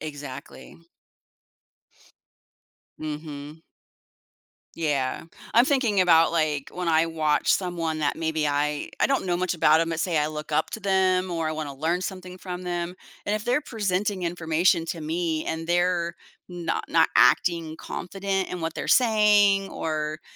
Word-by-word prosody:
Exactly. 145 -4 -9 2.2
Mhm. 150 0 -7 1.1
Yeah. 145 -4 -1 0.3
I'm 235 +2 +6
thinking 250 -8 +2
about, 165 -2 +5
like, 155 -4 -1
when 180 0 -4
I 160 0 +3
watch 155 -2 +1
someone, 170 -4 -1
that 145 -2 0
maybe 160 -2 -1
I 145 +1 -1
I - - +5
don't 275 -8 0
know 175 - +1
much 185 0 -1
about 160 0 +4
'em, 165 - 0
but 165 -1 -3
say 170 -2 0
I 150 0 +2
look 155 0 -7
up 155 +1 +1
to 220 - -6
them, 185 -1 +2
or 165 -2 -1
I - - -2
want 155 -2 -4
to 140 - -7
learn 165 +6 -1
something 185 -1 -6
from 180 -1 -6
them, 175 0 -3 0.3
and 205 - +1
if 215 - -3
they're 250 +4 +2
presenting 205 -6 -2
information 170 0 +1
to 165 0 -4
me, 160 0 -2
and 160 0 -4
they're 175 -1 +1 0.3
no 175 -1 -2
not - - +4
acting 165 -3 +3
confident 195 +1 -3
in 180 - -5
what 165 0 -3
they're - - -5
saying, 210 -4 +4
or 155 -1 -3
170 Hz, 155 wpm, -25 LUFS, 155-185 Hz, 2.2 s, I'm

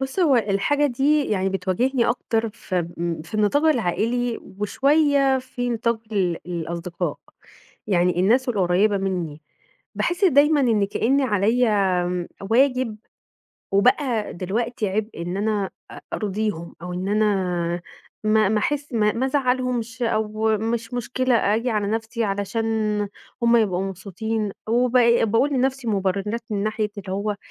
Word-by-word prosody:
بُصّ 265 +5 -4
هو 290 -7 +4
الحاجة 225 +7 +1
دي 285 +3 +2
يعني 195 -4 0
بتواجهني 200 +7 0
أكتر 230 -1 0
في 185 -5 -3
م 170 -2 -3
في 170 +6 -13
النطاق 215 +9 +2
العائلي 240 - +1 0.2
وشوية 275 +4 +3
في 255 -1 -4
نطاق 230 0 0
ال 180 -4 0
الأصدقاء، 170 0 -4 0.7
يعني 180 -2 +2
الناس 245 +8 +3
القريّبة 200 -1 +2
مني 175 -6 -3 0.5
باحس 350 +3 0
دايمًا 295 -2 +5
إن 225 -6 +3
كأني 260 +7 +1
عليَّ 225 +1 +2
آمم، 180 -4 0 0.2
واجب 255 -2 +2 0.8
وبقى 240 +2 +2
دلوقتي 215 +5 -2
عبء 210 -1 -3
إن 175 +2 -3
أنا 205 -1 -1 0.2
أ - - -10
أرضيهم 205 -4 -3
أو 180 0 -5
إن 180 +2 -3
أنا 185 -5 0 0.4
ما 215 -1 +3
ما 215 - +2
احس 290 +5 -2
ما 210 -2 +2
ما 255 +3 -1
ازعلهمش 250 -4 -1
أو 220 -1 +1
مش 225 +2 -3
مشكلة 250 +1 0
آجي 225 +3 +1
على 210 -2 0
نَفْسي 225 +2 -2
علشان 215 +1 -1 0.4
هُم 235 0 +5
يبقوا 190 -5 +1
مبسوطين، 200 +3 -3 0.2
وبق 240 0 +4
باقول 230 +6 +2
لنَفْسي 265 -1 0
مبررات 200 +2 -1
من 200 -2 -1
ناحية 215 0 -1
اللي 190 -1 -6
هو 205 +1 -2
220 Hz, 135 wpm, -23 LUFS, 195-245 Hz, 0.8 s, دايمًا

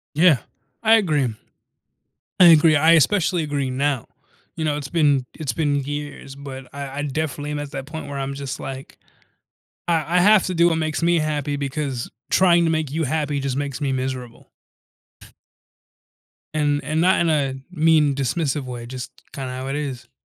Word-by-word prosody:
Yeah, 160 -3 +5 0.5
I 225 0 +6
agree. 150 - +1 1.1
I 180 - +9
agree. 160 -1 +7
I 160 +3 +5
especially 170 +2 +3
agree 145 -3 -2
now. 135 -1 -1 0.5
You 160 - -2
know, 150 -1 0
it's 140 -2 -6
been 145 -5 +2
it's 150 -4 -3
been 145 -3 0
years, 145 -1 -6
but 135 -2 -9
I 140 0 -6
I - - 0
definitely 145 0 -3
am 150 - -3
at 145 -1 -6
that 135 -2 -5
point 160 0 -7
where 140 -1 -5
I'm 135 0 -3
just, 140 -1 -5
like, 135 0 -8 0.9
I 165 0 +1
I - - +6
have 205 +2 +5
to 185 - -2
do 170 +1 +5
what 165 - 0
makes 155 0 -2
me 170 0 +3
happy, 150 -2 -1
because 140 -3 -3 0.2
trying 175 -2 +4
to 165 - +2
make 155 -3 -1
you 160 +2 -1
happy 145 0 -1
just 135 -1 -2
makes 145 0 -3
me 140 -2 0
miserable. 130 -2 -4 2.1
And 145 -1 +1
and 155 +4 -1
not 185 +2 +4
in 170 - +2
a 140 -4 +1 0.2
mean, 155 -4 +3
dismissive 140 +1 -1
way, 120 -2 -7
just 130 0 -7 0.2
kinda 130 -2 -5
how 130 +1 -5
it 135 - -2
is. 130 -5 -5
145 Hz, 180 wpm, -22 LUFS, 135-160 Hz, 2.1 s, I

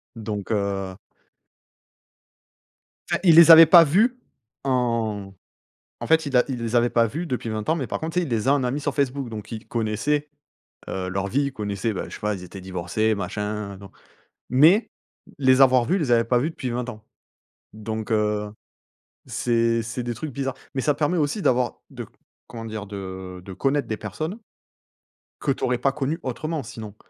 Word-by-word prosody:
Donc 105 -2 -5
heu 100 -2 -1 2.1
Enfin - - +1
il 170 -4 +6
les 170 0 +9
avait 165 0 +11
pas 170 +1 +8
vu 220 - +2 0.4
en 115 -6 -1 0.7
en - - -4
fait 160 0 +3
il 140 -2 -3
a 125 - +5
il 125 -3 -4
les 115 +1 -2
avait 120 0 +4
pas 115 -1 +3
vu 160 +10 -4
depuis 125 -6 -3
20 110 -1 -4
ans 160 - +3
mais 135 -7 -3
par - - -3
contre 160 +1 -4
tu 180 - +2
sais, 180 - -1
il - - -7
les 115 0 -1
a 135 - +5
en 140 -2 +1
amis 125 +4 -1
sur 145 -1 -3
Facebook 140 -2 -1
donc 110 -1 -8
il 110 -2 -7
connaissait, 120 +7 -1 0.6
heu, 95 -1 -3
leurs 95 +1 -2
vies. 135 +8 +1
Il 140 - -4
connaissait 105 -1 -3
bah, 95 - -4
je - - -8
sais - - -11
pas, 105 0 -1
ils 90 - -9
étaient 95 +2 -10
divorcés 95 +4 -1
machin, 105 +1 -4
non. 100 0 -13 0.6
Mais 160 - +5 0.5
les 130 -1 +4
avoir 130 -2 +5
vus, 175 - +1
il - - 0
les 145 -7 -1
avait 115 -1 +5
pas 120 +1 +2
vu 145 +6 0
depuis 130 -6 -5
20 125 +1 -3
ans. 110 -3 -10 0.7
Donc 110 +1 -5
heu, 105 -1 0 0.8
c'est 115 -1 +1
c'est 120 +2 -5
des 120 0 -3
trucs 140 +6 -6
bizarres. 135 -1 -3 0.2
Mais 135 - 0
ça 150 +1 +2
permet 150 +5 0
aussi 150 +7 -1
d'avoir 125 -4 +1
de, - - -7 0.4
comment 115 -1 -8
dire? 110 -2 -6
De 95 -2 -7
de 95 - -8
connaître 135 +8 0
des 110 - -2
personnes 155 - -5 1.0
que 140 - 0
tu 135 - -4
aurais 125 0 +1
pas 135 - +1
connues 145 +3 -2
autrement, 155 +3 -3
sinon. 110 -3 -9
120 Hz, 195 wpm, -24 LUFS, 105-140 Hz, 2.1 s, avait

